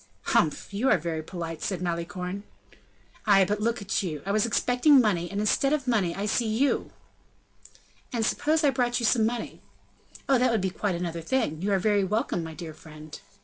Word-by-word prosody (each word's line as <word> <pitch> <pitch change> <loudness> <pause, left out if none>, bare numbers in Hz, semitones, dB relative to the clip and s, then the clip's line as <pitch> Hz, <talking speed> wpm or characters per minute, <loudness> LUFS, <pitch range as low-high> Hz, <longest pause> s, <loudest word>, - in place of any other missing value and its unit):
"Humph! 155 +5 +1
you 235 +7 +1
are - - +5
very 160 -1 -3
polite!" 165 -1 -6
said 190 -4 -2
Malicorne. 180 +2 -4 0.9
"Ay, 195 -2 +6
but 210 +2 -2
look 230 +1 0 0.2
you, 155 -7 -4
I 200 - -1
was 215 +2 +2
expecting 250 +5 +4
money, 180 -7 +1
and, 200 - -3
instead 270 +7 +2
of 280 -4 -1
money, 200 -8 +1
I 200 - -3
see 225 +2 0
you." 235 +6 +1 1.2
"And 230 -3 0
suppose 310 +6 +1
I 285 - +4
brought 245 -2 0
you 235 - -1
some 220 -1 +3
money?" 240 0 -5 0.7
"Oh! 270 -2 +4
that 255 +1 +3
would 230 -2 +1
be 190 0 -1
quite 195 0 -2
another 170 -1 -4
thing. 165 - -1
You 200 +2 -1
are 195 - +3
very 205 +1 +2
welcome, 190 -3 -1
my 160 -1 -7
dear 165 -2 -7
friend!" 155 0 -12
200 Hz, 190 wpm, -27 LUFS, 170-235 Hz, 1.2 s, Ay